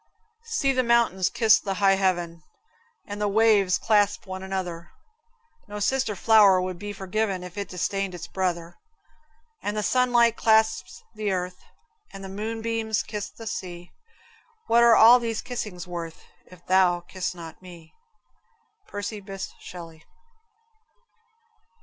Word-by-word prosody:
See 275 -9 +2
the 255 - +2
mountains 235 -6 +2
kiss 225 -2 +4
high 195 0 +2
heaven, 175 -3 -1 0.6
And 205 0 -7
the 210 - +1
waves 205 -3 +3
clasp 210 -2 +1
one 190 -1 -6
another; 185 -3 -5 0.8
No 210 0 -6
sister 255 0 0
flower 205 -2 +5
would 185 -1 -4
be 205 +1 -5
forgiven 195 -1 -2
If 180 -1 -10
it 200 -2 -5
disdained 190 +1 -2
its 175 - -7
brother; 175 -2 -3 0.8
And 205 +2 -3
the 210 - -1
sunlight 240 -1 +3
clasps 220 -4 +1
the 215 -2 -2
earth, 180 -1 -3 0.5
And 195 - -10
the 190 - -7
moonbeams 225 +1 -2
kiss 210 -2 -5
the 225 - -12
sea; 180 -4 -6 0.7
What 235 +1 +4
are 235 -1 +7
all 235 +3 +8
these 230 -2 -3
kissings 210 -7 -5
worth, 170 -2 -7 0.2
If 180 -1 -17
thou 185 -2 +3
kiss 180 +1 -5
not 165 -1 -10
me? 175 -3 -14 0.9
Percy 205 +1 -5
Bysshe 195 -1 -7
Shelley. 165 -3 -11
195 Hz, 135 wpm, -25 LUFS, 180-220 Hz, 0.9 s, all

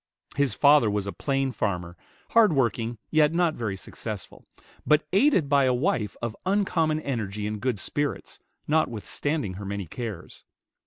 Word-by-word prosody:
His 140 -1 +1
father 145 -6 +5
was 105 -1 -1
a 100 - -4
plain 135 -1 -1
farmer, 90 -6 -3 0.4
hard 225 -6 +5
working, 120 -3 0
yet 155 0 +4
not 170 -2 +2
very 110 -7 -3
successful, 100 +1 -8 0.4
but 150 0 +3
aided 200 - +4
by 140 -1 +4
a 125 -1 +2
wife 110 -4 -1
of 115 -1 -2
uncommon 180 -5 +1
energy 105 -7 -3
and 105 -1 -4
good 125 -4 0
spirits, 145 +8 -3 0.3
notwithstanding 145 - -1
her - - -6
many 100 0 -4
cares. 110 +1 -7
125 Hz, 150 wpm, -26 LUFS, 105-150 Hz, 0.4 s, father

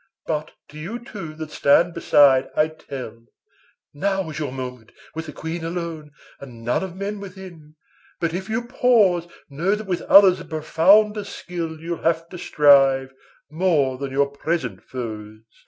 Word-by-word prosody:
But 155 -1 -2 0.2
to 150 - -11
you 195 +10 -5
two 195 -9 -9
that 155 -1 -7
stand 165 +5 +3
beside 140 -5 +4
I 155 +1 +3
tell, 125 -7 -9 0.7
Now 195 +2 -1
is 150 - -6
your 145 -4 -3
moment, 125 -3 -7 0.2
with 160 0 -6
the - - -6
Queen 160 +3 -6
alone, 165 -2 -5 0.3
And 120 -4 -11
none 120 +2 0
of 185 -2 -6
men 200 +2 -4
within; 185 -6 -11 0.4
but 165 -1 -1
if 190 +3 -5
you 225 +2 -1
pause, 220 -9 +3 0.2
Know 170 +8 0
that 215 +1 -7
with 180 -3 -2
others 195 -2 +7
of - - -11
profounder 195 +7 +3
skill 170 -5 -6
You'll 170 +1 -5
have 165 0 0
to 180 - -9
strive, 135 -3 +4 0.4
more 150 -6 +1
than 140 -1 -4
your 140 +1 +1
present 140 - -3
foes. 110 -4 -7
OR. 115 - -34
160 Hz, 165 wpm, -22 LUFS, 140-185 Hz, 0.7 s, others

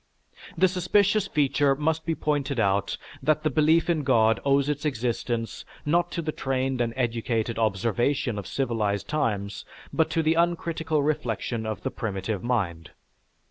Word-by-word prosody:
"The 185 +3 +5
suspicious 195 +3 +2
feature 140 -3 +2
must 160 +3 -1
be 165 - +1
pointed 145 -4 -1
out 100 -1 +1 0.2
that 155 0 +1
the 155 - +1
belief 155 +4 +3
in 170 -3 +1
God 115 -4 +3
owes 140 0 +3
its 150 0 -2
existence, 120 -4 -2 0.2
not 175 +3 +2
to 170 - -2
the 155 - -1
trained 135 -2 -1
and 115 -1 0
educated 115 -2 -1
observation 115 +3 0
of 100 - -7
civilized 110 -6 -1
times, 105 -9 -1 0.3
but 160 - +2
to 165 - 0
the 155 +1 +3
uncritical 165 -2 0
reflection 120 -6 -2
of 110 - -4
the 130 - -2
primitive 100 -2 -3
mind. 95 -10 -1
135 Hz, 150 wpm, -26 LUFS, 115-155 Hz, 0.3 s, The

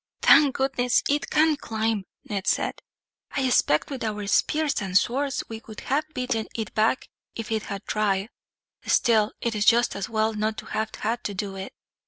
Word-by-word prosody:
"Thank 290 -4 +6
goodness 260 -2 +1
it 290 +1 0
can't 310 -1 +3
climb!" 220 -2 -1 0.2
Ned 200 -2 -4
said. - - 0 0.6
"I 270 - +1
expect, 245 - +2
with 270 - -4
our 210 -2 -3
spears 300 +8 +1
and 190 -2 +2
swords, 270 +5 0
we 225 -1 -7
could 220 -1 -11
have 305 +3 -1
beaten 250 -3 -1
it 220 -4 -4
back 220 +4 +1 0.3
if 225 -1 -6
it 220 -1 +1
had 200 0 -5
tried; 205 -1 0 0.6
still, 220 -2 +3
it 235 - -1
is 210 -1 0
just 235 +1 +4
as 200 - -4
well 220 0 +1
not 215 +1 -1
to - - -7
have 220 0 -2
had 230 +3 -2
to 205 - -3
do 195 0 -4
it. 190 0 -7
220 Hz, 185 wpm, -25 LUFS, 210-255 Hz, 0.6 s, Thank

